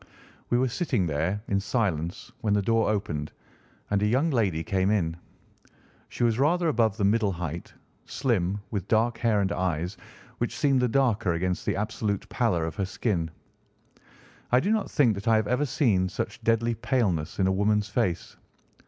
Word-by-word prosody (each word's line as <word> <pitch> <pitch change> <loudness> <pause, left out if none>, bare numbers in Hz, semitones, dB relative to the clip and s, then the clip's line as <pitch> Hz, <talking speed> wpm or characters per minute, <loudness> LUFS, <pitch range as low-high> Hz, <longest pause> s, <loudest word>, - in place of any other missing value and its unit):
We 120 - +3
were 130 +1 +2
sitting 125 - 0
there 85 +7 -1
in 100 - +1
silence 95 -6 -2
when 105 -3 +1
the 105 - +2
door 115 +2 +2
opened 85 -8 -2 0.6
and 100 -1 +2
a 105 - +2
young 135 +9 +2
lady 95 - +1
came 95 +3 +1
in. 85 -6 +1 0.9
She - - -3
was 115 0 +2
rather 170 +5 +2
above 115 -6 +1
the 105 - -1
middle 105 0 +3
height, 85 -1 -5 0.3
slim, 100 -8 0
with 100 -4 -3
dark 115 +1 +2
hair 110 -3 +2
and 95 - 0
eyes, 90 +1 -2 0.4
which - - -2
seemed 135 -2 +3
the 125 - +3
darker 115 -7 +2
against 90 +2 -2
the - - +1
absolute 105 -1 -2
pallor 105 -11 +1
of 80 -1 -5
her 100 - 0
skin. 95 -4 -1 1.2
I 125 - +6
do 195 +10 0
not 220 -1 0
think 125 -7 +3
that 100 +2 -7
I 115 - +5
have 110 -1 +1
ever 125 +5 +1
seen 100 -9 +2
such - - -5
deadly 115 +1 +2
paleness 105 - -1
in 95 - +2
a 95 - +3
woman's 105 +2 +1
face. 105 -6 -1
105 Hz, 180 wpm, -27 LUFS, 95-120 Hz, 1.2 s, I